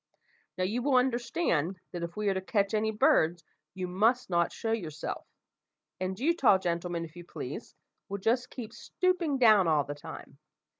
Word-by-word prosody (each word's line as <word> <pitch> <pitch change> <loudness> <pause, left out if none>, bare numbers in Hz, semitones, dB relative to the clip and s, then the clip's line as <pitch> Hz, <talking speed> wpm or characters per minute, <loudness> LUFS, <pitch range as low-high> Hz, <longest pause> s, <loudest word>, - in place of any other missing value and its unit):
"Now, 185 - 0
you 215 +7 0
will 275 +1 +2
understand, 240 - +1
that 175 - -5
if 170 +3 -5
we 210 -1 -1
are - - +2
to 190 - -2
catch 200 +2 0
any 215 0 +1
birds, 175 -5 +3 0.3
you 185 -1 -3
must 220 +5 +1
not 170 0 +2
show 225 - -3
yourself; 160 -9 -4 0.7
and 185 +1 -3
you, 325 +6 +2
tall 240 - +5
gentleman, 170 -1 -2
if 160 0 -14
you 175 - -9
please, - - -7 0.3
will 200 - -3
just 240 +5 +1
keep 225 -3 -8
stooping 340 +3 0
down 215 -7 +6
all 155 -3 +3
the 145 - -5
time. 145 - -10
200 Hz, 180 wpm, -30 LUFS, 175-240 Hz, 0.7 s, down